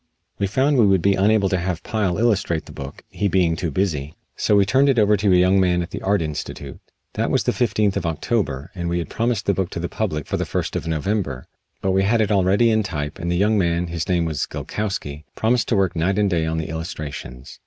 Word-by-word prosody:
We 100 - +1
found 130 +6 +2
we 110 - +6
would 95 -3 +3
be 100 - +4
unable 100 +1 +3
to 95 - 0
have 90 -1 -3
Pyle 105 -6 -1
illustrate 100 -7 +1
the - - -11
book, 70 0 -9
he 105 - -1
being 90 -3 +2
too 85 0 -2
busy, 75 -3 -2 0.2
so 105 - +2
we 100 -1 +5
turned 135 +7 +3
it 135 - +2
over 105 -1 +4
to 100 0 +1
a - - +6
young 90 +2 +4
man 90 -2 +2
at 85 - -9
the - - -5
Art 100 -2 +1
Institute. 75 -2 -6 0.3
That - - -1
was - - +1
the - - +1
fifteenth 105 -4 +1
of 95 -4 -1
October, 80 - -2
and 85 -3 -3
we 85 - 0
had 85 - -3
promised 115 -3 -1
the 100 - +2
book 95 -2 -1
to - - -5
the 85 - -2
public 80 -10 -3
for - - -2
the - - -1
first - - -2
of - - -3
November, 80 -4 -2 0.4
but 95 - +2
we 95 +1 +3
had 110 +4 +2
it 110 -1 +1
already 100 +4 +3
in 110 0 +3
type 75 -7 -4
and 85 0 -2
the 85 - +1
young 105 +3 +3
man, 85 -1 +1
his 85 +2 -4
name 85 -2 +2
was 80 -3 -2
Gilkowsky, 75 -9 -4
promised 115 +2 +1
to 115 - +1
work 95 -3 +1
night 90 +4 0
and 100 -1 +2
day 80 -2 +1
on 80 0 -1
the 80 - -3
illustrations. 75 -6 -7
95 Hz, 250 wpm, -22 LUFS, 80-105 Hz, 0.4 s, we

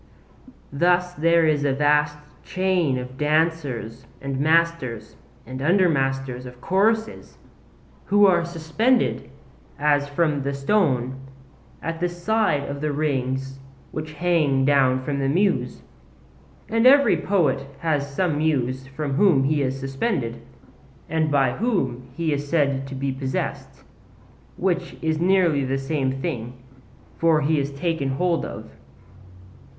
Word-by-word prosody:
Thus 180 +4 +2
there 165 0 +3
is 150 -2 +2
a 140 -2 +1
vast 150 +1 +2 0.3
chain 185 -7 0
of 125 +1 -7
dancers 150 -6 -1
and 135 -1 -4
masters 155 -8 0 0.3
and 130 +2 -7
under 180 +5 +3
masters 135 -4 -1
of 125 0 -12
choruses, 220 - 0 0.7
who 205 +1 +4
are 175 -3 +4
suspended, 170 +9 0 0.5
as 145 0 +2
if 145 - -14
from 150 -4 +1
the 140 +1 -2
stone, 140 - +1 0.7
at 165 +1 -4
the 175 +1 0
side 175 -4 0
of 140 0 -5
the 150 0 -1
rings 135 -2 -2 0.3
which 155 0 -6
hang 150 -5 +1
down 130 -2 +3
from 140 +1 -2
the 135 0 0
Muse. 190 +7 0 0.8
And 230 +2 +3
every 280 +2 +6
poet 145 -8 0
has 145 -4 -1
some 150 0 0
Muse 130 -4 -1
from 140 +1 -4
whom 150 -4 +4
he 145 +1 +1
is 135 0 -2
suspended, 135 - -2 0.7
and 160 -1 +1
by 135 -4 +2
whom 130 - -2
he 165 -2 0
is 145 0 -4
said 140 -4 +1
to 135 - -7
be 135 +1 -2
possessed, 130 0 -4 0.7
which 175 -1 -1
is 160 -1 0
nearly 175 -5 +3
the 135 +1 -1
same 135 -1 -1
thing; 125 -8 -4 0.7
for 165 -2 +3
he 150 +1 +1
is 140 0 -2
taken 145 -1 -2
hold 170 +5 0
of. - - -9
150 Hz, 135 wpm, -23 LUFS, 135-170 Hz, 0.8 s, every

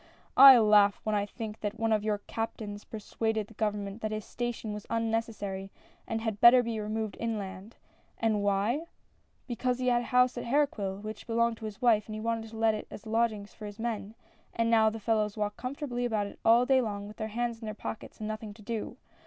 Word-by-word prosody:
" - - -35 0.2
I 260 - +8
laugh 210 -2 +5
when 215 - -1
I 205 -1 +1
think 220 0 -7
that 210 +2 -4
one 225 0 +1
of 210 -1 +1
your 215 -1 0
captains 215 -2 -5
persuaded 220 0 -2
the 220 - -17
government 210 -1 -3
that 215 - -1
this 215 -1 -4
station 240 -3 -4
was 210 -1 -8
unne 230 0 -1
cessary, 205 -4 -3 0.4
and 225 0 -2
had 220 -2 -3
better 245 +1 +8
be 230 -2 -3
removed 215 0 -3
inland. 205 -2 -4 0.4
And 220 -2 +1
why? 205 +9 +1 0.3
— - - -41
"Because 250 0 -1
he 255 0 +1
had 240 -1 +3
a - - -6
house 250 0 +3
at - - -6
Herqueville, 225 -7 0
which 215 +2 -7
belonged 235 0 +1
to 220 - -8
his 215 +3 -7
wife, 220 -4 +4
and 215 - -6
he - - -5
wanted 225 0 -2
to 225 - -10
let 225 0 +3
it 215 - -5
as 210 - -10
lodg 225 +1 +2
ings 205 -1 -9
for 215 - -8
his 205 0 -9
men, 225 -2 -4 0.4
and 230 0 +1
now 220 -1 +5
the 225 +1 -6
fellows 215 -1 0
walk 210 -1 -1
comfortably 250 -1 -4
about 215 -4 -1
all 235 +2 +6
day 265 0 +4
long, 205 -3 -4
with 210 - -11
their 220 - -3
hands 235 +1 -2
in 225 - -8
their 215 0 -5
pockets, 220 - -7
and 215 - -4
nothing 215 -1 -6
to 215 - -15
do 225 +1 -4
220 Hz, 225 wpm, -30 LUFS, 210-230 Hz, 0.4 s, I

